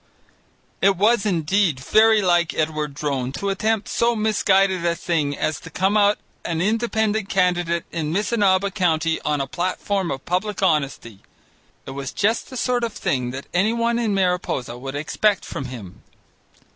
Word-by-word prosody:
It 195 -1 +4
was 215 +2 +3
indeed 175 -3 +1
very 215 +8 +4
like 175 -2 +2
Edward 155 -2 -2
Drone 135 -4 -2
to 200 +7 -3
attempt 215 +2 0
so 235 0 +1
misguided 195 -4 +2
a 170 0 +1
thing 155 -5 -1
as 155 - -1
to - - -11
come 190 +6 0
out 205 0 +4 0.3
an 165 -1 -2
Independent 220 +1 0
candidate 175 -2 +1
in 155 -2 -3
Missinaba 200 0 +2
County 165 -4 0
on 150 -1 -1
a 135 - -1
platform 185 +4 -2
of 135 -1 -5
public 195 +3 -2
honesty. 140 - 0 0.7
It - - -7
was 135 -1 -5
just 220 +3 0
the 255 - -7
sort 245 -1 0
of 230 -2 -2
thing 125 -2 -1
that 135 +2 -6
anyone 230 +5 +1
in 220 -4 0
Mariposa 180 -10 -1
would 135 +2 -7
expect 195 +7 0
from 135 - -5
him. 115 -8 -9
180 Hz, 160 wpm, -22 LUFS, 150-210 Hz, 0.7 s, It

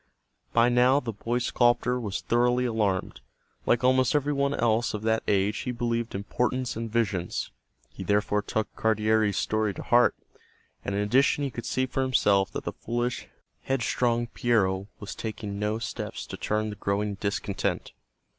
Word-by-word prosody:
By 115 +1 +4
now 125 +3 +4
the 120 -5 -5
boy 115 +4 -2
sculptor 125 0 +2
was 105 -5 -3
thoroughly 125 +1 +2
alarmed. 100 - -1 0.5
Like 120 - +3
almost 130 +2 +3
every 145 0 +1
one 140 0 +1
else 115 -1 +1
of 105 - -5
that 110 0 +2
age 100 +1 +1
he 125 - -3
believed 115 -2 -2
in 100 - -3
portents 125 +3 -1
and 115 0 -4
visions; 100 -6 -1 0.4
he - - -9
therefore 105 0 +1
took 110 +1 -3
Cardiere's 110 -1 +2
story 110 -2 0
to - - -6
heart, 120 0 +4 0.7
and 100 - -2
in 100 - +1
addition 135 +7 +3
he 140 - -2
could 120 - -6
see 130 - +1
for 130 +1 -2
himself 100 -7 +3
that - - -4
the - - -4
foolish, 120 +1 -3 0.4
headstrong 120 -2 +1
Piero 100 -5 +1
was 100 - -6
taking 105 -2 -5
no 105 +1 0
steps 115 - -5
to - - -7
turn 110 0 -1
the - - -7
growing 100 +1 -1
discontent. 100 0 -2
115 Hz, 165 wpm, -27 LUFS, 105-125 Hz, 0.7 s, By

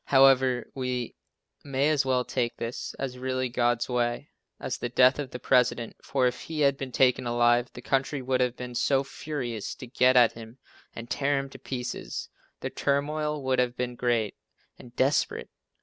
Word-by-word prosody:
However, 130 -2 +4
we 125 -2 -3 0.5
may 140 +2 +1
as 145 -2 +2
well 125 -1 +2
take 120 -1 -2
this 115 +1 -5
as 125 -2 -5
really 130 0 -1
God's 120 0 +1
way, 120 +2 -1 0.3
as 125 - -4
the 120 - -3
death 125 +3 +5
of 140 -3 -3
the 125 - -6
President, 125 -2 +1
for 135 -2 +1
if 125 - 0
he 160 -2 -4
had 140 -1 +4
been 135 -1 -6
taken 125 0 +3
alive, 120 +1 +3
the 120 - -10
country 135 +2 0
would 130 0 0
have 125 -1 +1
been 125 0 -7
so 135 +2 +2
furious 135 -6 -5
to - - -9
get 125 +1 +3
at 120 -2 +6
him 115 +1 -11 0.4
and 115 0 -7
tear 140 +3 0
him 135 0 -4
to - - -11
pieces 125 -1 -5 0.3
the - - -3
turmoil 150 +1 -1
would 130 -1 +1
have 125 -1 0
been 125 0 -2
great 120 -3 0 0.5
and 120 -1 -14
desperate. 135 +3 +1
125 Hz, 180 wpm, -27 LUFS, 120-135 Hz, 0.5 s, at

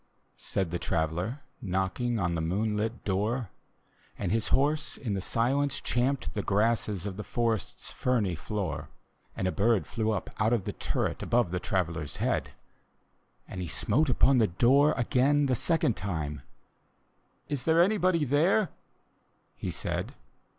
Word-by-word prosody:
" - - -42 0.2
said 95 -4 0
the 85 - -2
Traveller, 85 - -1 0.2
Knocking 95 +4 -1
on 90 -4 0
the 80 - -1
moonlit 105 +6 -1
door; 105 +3 -1 0.7
And - - -2
his 115 0 +1
horse 150 +2 +1
in 115 -7 -3
the 95 - -1
silence 135 +7 +1
champed 130 +3 0
the 105 - -1
grasses 105 -2 +1
Of 100 -2 -4
the 105 - -4
forest's 115 -3 -2
ferny 115 -8 +1
floor: 95 +3 -4 0.5
And 95 - 0
a - - +1
bird 105 -4 +2
flew 110 +4 -2
up 110 - -2
out 110 +3 +3
of 115 -5 +1
the - - -4
turret. - - -2
Above 120 -7 +1
the 90 - -1
Traveller's 80 -6 -2
head: - - 0 1.0
And 90 - -6
he 90 - -3
smote 145 - +1
upon 130 +1 +4
the 110 - +4
door 130 - +4
again 140 +3 +3
the 130 - +1
second 135 -2 +2
time; 80 -7 -3 0.5
" - - -42
Is 140 -4 -3
there 160 +1 +4
anybody 185 -4 +3
there? 165 - +3 0.5
" - - -42
he - - -1
said. - - -3
110 Hz, 155 wpm, -29 LUFS, 95-135 Hz, 1.0 s, upon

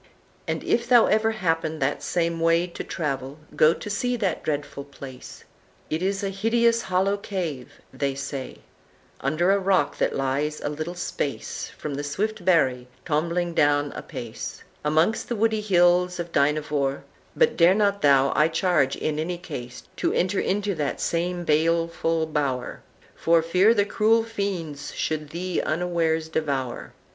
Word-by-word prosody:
"And - - -2
if 235 0 +1
thou 240 -3 +7
ever 220 +1 +2
happen 165 -7 -1
that 140 0 -1
same 170 -1 -1
way 165 +1 +3
To 175 - -7
travel, 140 -3 -3 0.2
go 155 - +6
to - - -9
see 245 +5 -1
that 205 -6 -1
dreadful 145 -2 -3
place; 135 -2 -11 0.5
It 155 +2 -1
is 195 +2 -1
a 195 - 0
hideous 230 +3 +2
hollow 190 +2 +1
cave 170 -11 -5 0.2
(they 140 -1 -1
say) 140 -1 -6 0.6
Under 155 +7 +1
a 200 - +3
rock 190 -6 +1
that - - +1
lies 140 +3 -1
a - - -3
little 155 +4 -5
space 150 -5 -4
From 150 - -5
the 145 +1 -3
swift 200 +8 -2
Barry, 130 -9 +2 0.2
tombling 170 +2 0
down 145 -2 +2
apace 115 -2 -7 0.2
Amongst 160 +8 +1
the 240 - -1
woody 220 0 +1
hills 180 -2 +3
of 170 0 -4
Dynevor; 145 -1 +1 0.3
But 475 - +3
dare 175 +2 +5
not 200 -1 +1
thou, 140 -2 +4
I 150 - +5
charge, 160 -4 +1
in 155 0 -2
any 175 +3 -2
case, 125 -8 -8
To - - +1
enter 185 +2 +1
into 200 +1 0
that 150 -5 -2
same 175 +1 -1
baleful 165 +1 +1
bower, 140 -5 -2 0.3
For 165 0 +3
fear 185 +7 +4
the 205 -2 +3
cruel 220 +2 +3
fiends 185 -10 -4
should 155 -2 -2
thee 175 +2 -2
unwares 165 -1 0
devour. 140 -6 -3
165 Hz, 155 wpm, -25 LUFS, 145-190 Hz, 0.6 s, thou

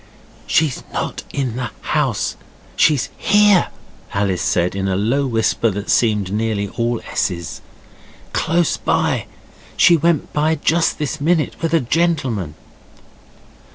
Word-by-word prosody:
'She's 150 -5 +1
not - - -3
in 130 -4 -2
the 125 -3 -3
house; - - -1 0.4
she's 145 -6 +3
HERE,' 205 -2 +4 0.5
Alice 100 -3 0
said 90 0 +1
in 95 0 -2
a 95 - 0
low 120 +8 +1
whisper 115 -1 +1
that 100 +1 -3
seemed 105 -5 +2
nearly 105 -2 -1
all 115 +1 -1
S's. 85 -5 -3 0.7
'Close 170 0 +1
by - - 0 0.5
she 170 - +6
went 165 -1 0
by 155 +2 +2
just 165 +2 +1
this 150 0 -3
minute 160 0 +1
with 165 -1 -1
a - - +4
gentleman. 130 - 0
125 Hz, 125 wpm, -19 LUFS, 105-160 Hz, 0.7 s, she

